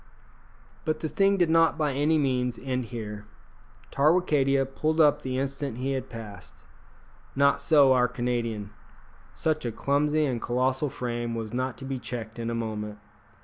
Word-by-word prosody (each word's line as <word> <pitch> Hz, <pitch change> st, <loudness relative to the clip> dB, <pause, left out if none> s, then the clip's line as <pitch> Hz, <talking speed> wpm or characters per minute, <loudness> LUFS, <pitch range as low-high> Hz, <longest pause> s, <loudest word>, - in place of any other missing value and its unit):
But 155 Hz, -1 st, -2 dB
the 160 Hz, -, -1 dB
thing 195 Hz, +3 st, +3 dB
did 175 Hz, -3 st, +2 dB
not 165 Hz, 0 st, +4 dB
by 150 Hz, -3 st, 0 dB
any 150 Hz, +4 st, +2 dB
means 125 Hz, -4 st, 0 dB
end 130 Hz, -2 st, -3 dB
here. 105 Hz, -3 st, -7 dB, 0.6 s
Tarwicadia 140 Hz, -3 st, +3 dB
pulled 155 Hz, +4 st, -1 dB
up 150 Hz, -3 st, +5 dB
the 130 Hz, -1 st, -3 dB
instant 135 Hz, -2 st, -3 dB
he 130 Hz, +2 st, -2 dB
had 135 Hz, -1 st, -3 dB
passed. 105 Hz, -5 st, -10 dB, 0.7 s
Not 140 Hz, +1 st, +3 dB
so 145 Hz, -4 st, +5 dB
our 125 Hz, -1 st, +3 dB
Canadian. 115 Hz, -5 st, -2 dB, 0.6 s
Such 155 Hz, -1 st, 0 dB
a 120 Hz, -, -2 dB
clumsy 150 Hz, +5 st, +1 dB
and 125 Hz, -5 st, -2 dB
colossal 130 Hz, +4 st, 0 dB
frame 120 Hz, -2 st, -3 dB
was 110 Hz, -1 st, -5 dB
not 130 Hz, 0 st, -2 dB
to 135 Hz, -, -8 dB
be 135 Hz, -1 st, -3 dB
checked 115 Hz, -1 st, -6 dB
in 115 Hz, 0 st, -2 dB
a 115 Hz, -, -2 dB
moment. 105 Hz, -2 st, -4 dB
130 Hz, 160 wpm, -27 LUFS, 115-145 Hz, 0.7 s, up